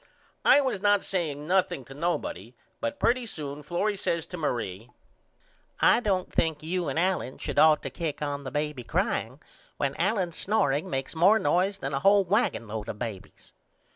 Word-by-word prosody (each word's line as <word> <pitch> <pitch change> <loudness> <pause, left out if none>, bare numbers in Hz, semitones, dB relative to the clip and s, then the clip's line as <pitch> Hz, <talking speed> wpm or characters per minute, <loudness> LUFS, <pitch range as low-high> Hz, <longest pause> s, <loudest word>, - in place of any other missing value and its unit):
I 290 - +6
was 255 -8 -1
not 205 -1 +3
saying 155 -6 -2
nothing 180 -5 +1
to 135 - -11
nobody 130 - -3 0.2
but 290 0 -3
pretty 245 0 +2
soon 145 -6 -6
Florrie 195 +7 -1
says 170 -4 -1
to 180 - -8
Marie 120 - -3 0.9
I - - +5
don't 195 -6 -1
think 160 -2 0
you 175 +2 -2
and - - -2
Allen 175 -7 0
should - - -2
ought 155 -1 +6
to 135 - -4
kick 155 +1 -4
on 145 -1 -3
the 130 - -5
baby 150 -1 -3
crying - - -1 0.4
when 140 0 -1
Allen's 185 -2 0
snoreing 160 -5 +1
makes 135 -3 -3
more 180 +7 +5
noise 195 -1 +1
than 140 -7 -4
a 135 - 0
hole 200 +3 +5
wagonlode 115 - -1
of 105 - -5
babys. 110 -5 -8
165 Hz, 170 wpm, -27 LUFS, 135-195 Hz, 0.9 s, I